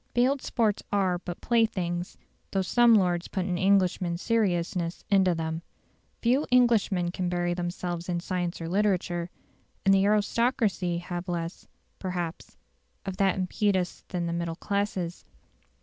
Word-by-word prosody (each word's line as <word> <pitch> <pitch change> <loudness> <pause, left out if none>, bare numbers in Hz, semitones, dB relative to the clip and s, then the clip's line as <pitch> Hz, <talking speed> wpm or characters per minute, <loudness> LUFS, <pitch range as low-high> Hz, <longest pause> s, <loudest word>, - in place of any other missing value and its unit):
Field 260 +3 +3
sports 215 -3 0
are 190 -3 +1
but 175 -1 -7
playthings, 185 -7 0 0.3
though 195 -1 0
some 240 +4 +5
lords 180 -4 +2
put 190 -3 -2
an 180 -2 -1
Englishman's 185 -3 +2
seriousness 180 -6 0
into 190 -3 +4
them. 160 0 -3 0.6
Few 250 +5 +3
Englishmen 220 -8 +3
can 180 0 -2
bury 175 0 0
themselves 175 0 -4
in 175 -1 0
science 175 -1 -3
or 165 - -4
literature; 180 -2 0 0.6
and 195 - +6
the 195 0 +4
aristocracy 210 -4 +1
have 175 +1 -5
less, 170 0 -4 0.3
perhaps, 175 -3 -5 0.5
of 190 -1 -4
that 195 -2 +3
impetus 190 -1 0
than 175 -2 -2
the 170 - -2
middle 170 -1 -2
classes. 195 -3 -2
185 Hz, 135 wpm, -27 LUFS, 175-205 Hz, 0.6 s, and